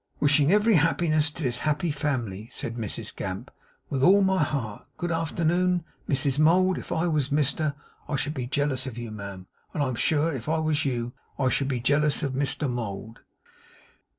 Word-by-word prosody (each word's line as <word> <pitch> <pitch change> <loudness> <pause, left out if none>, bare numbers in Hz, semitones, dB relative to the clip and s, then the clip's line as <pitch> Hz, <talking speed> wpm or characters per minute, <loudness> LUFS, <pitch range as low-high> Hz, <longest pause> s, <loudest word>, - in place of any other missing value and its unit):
'Wishing 145 +1 +4
ev'ry 210 +2 +4
happiness 155 -1 +2
to 150 +2 -8
this 125 -2 +1
happy 155 +2 0
family,' 120 -8 -2
said 115 - -4
Mrs 110 -4 -4
Gamp - - -5 0.4
'with 135 - -2
all 195 +7 +6
my 190 -2 +2
heart. 125 -9 -2
Good 175 -1 -2
arternoon, 170 +2 +1 0.2
Mrs 140 0 +1
Mould! 180 +4 +4
If - - -10
I 170 0 +1
was 150 -5 +1
Mr 145 0 +1 0.3
would - - -4
I - - +2
should 145 +2 -1
be 130 -5 -4
jealous 140 -1 0
of 120 -3 -6
you, 120 -2 -5
ma'am; 100 -3 -7 0.3
and 145 - +1
I'm 130 -2 -1
sure, 155 +6 +1
if 130 +1 -5
I 160 - +2
was 155 -1 +1
you, 120 -2 -2 0.2
I 130 -2 +2
should 135 +2 +1
be 130 -3 -1
jealous 145 +5 +2
of 140 -2 -1
Mr 140 +2 0
Mould. 115 -3 -5
145 Hz, 185 wpm, -26 LUFS, 125-160 Hz, 0.4 s, all